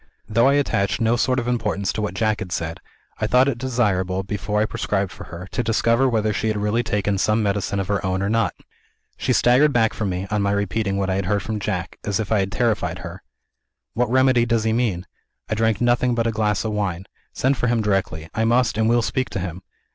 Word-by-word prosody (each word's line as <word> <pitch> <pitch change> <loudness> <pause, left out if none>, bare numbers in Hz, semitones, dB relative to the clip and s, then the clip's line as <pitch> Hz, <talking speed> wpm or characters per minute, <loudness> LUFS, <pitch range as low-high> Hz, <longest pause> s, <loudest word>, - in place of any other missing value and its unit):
Though 115 +4 +3
I 140 - +4
attached 105 -8 +1
no 115 0 +2
sort 130 +2 +1
of 120 -1 -1
importance 105 -5 -1
to 110 - -3
what 105 - -3
Jack 110 -2 +1
had 90 - -6
said, 85 -1 -3 0.4
I - - 0
thought 125 +2 +4
it 125 -4 -1
desirable, 100 -7 0
before 105 +1 -2
I 110 - +3
prescribed 100 -3 -2
for - - -10
her, 85 +2 -9
to - - -1
discover 115 +3 +2
whether 110 -2 +1
she 110 - -1
had 110 -1 0
really 105 +3 +1
taken 105 -3 -1
some 110 +2 +2
medicine 100 0 -1
of 95 - -2
her 100 0 -1
own 95 0 -1
or - - 0
not. 115 0 +1 0.6
She - - -1
staggered 130 +5 +4
back 115 -4 +2
from 105 -3 -2
me, 90 +1 -3
on 105 -1 +1
my 100 0 +1
repeating 100 0 -1
what 95 -1 0
I 95 - 0
had 95 -2 -2
heard 100 +1 0
from 110 -1 -3
Jack, 95 -4 -4
as 100 -2 -1
if 110 -1 -3
I 110 - +3
had 95 0 -1
terrified 115 -3 0
her. - - -8 0.7
'What 120 -1 0
remedy 130 -1 +4
does 115 -2 +1
he 110 0 +1
mean? 110 -7 0 0.4
I - - -2
drank 110 -1 +1
nothing 120 0 +2
but 115 -1 0
a 115 - +1
glass 105 -1 0
of 110 - -1
wine. 95 -4 -2 0.3
Send 135 +2 +1
for 125 - 0
him 115 -2 +1
directly 95 -6 -1
I 110 - 0
must, 115 -1 +2
and 110 0 +3
will 120 0 +3
speak 130 +3 -1
to - - -4
him!' 90 0 -5
110 Hz, 240 wpm, -22 LUFS, 100-115 Hz, 0.7 s, I